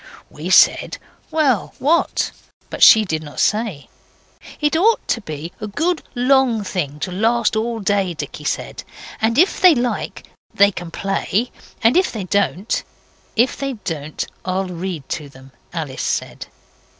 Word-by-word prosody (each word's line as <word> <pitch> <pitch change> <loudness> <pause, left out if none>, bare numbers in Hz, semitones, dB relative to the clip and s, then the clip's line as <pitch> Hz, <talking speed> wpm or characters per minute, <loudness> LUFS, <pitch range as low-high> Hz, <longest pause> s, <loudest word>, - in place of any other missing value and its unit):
We - - -6
said, - - +5 0.3
well 275 - +1
what? 325 +4 +1 0.4
But - - -6
she 220 -1 +8
did 160 -4 -2
not 145 -2 -9
say. 210 -9 0 0.7
'It 295 +1 +1
ought 430 +8 +3
to 230 - +1
be 155 -2 -7
a 215 - -3
good 325 - -1
long 250 -3 +3
thing 150 -7 -3
to 185 - -3
last 225 +4 +1
all 225 +1 -1
day,' 195 -3 0
Dicky - - -7
said, - - -3 0.4
'and 225 +2 +1
if 360 +6 +3
they 365 -4 +7
like 245 -1 -2 0.3
they 200 0 +5
can 175 -3 -7
play, 195 +6 -1 0.3
and 230 +2 +5
if 370 +1 +3
they 215 -4 -4
don't 200 +2 0 0.3
' - - -34
'If 240 +4 +3
they 275 -1 -3
don't, 160 - -5 0.2
I'll 185 +1 -1
read 175 -4 -5
to 150 -3 -4
them,' 135 0 -16 0.2
Alice 155 -6 -4
said. - - -3
205 Hz, 155 wpm, -20 LUFS, 175-245 Hz, 0.7 s, she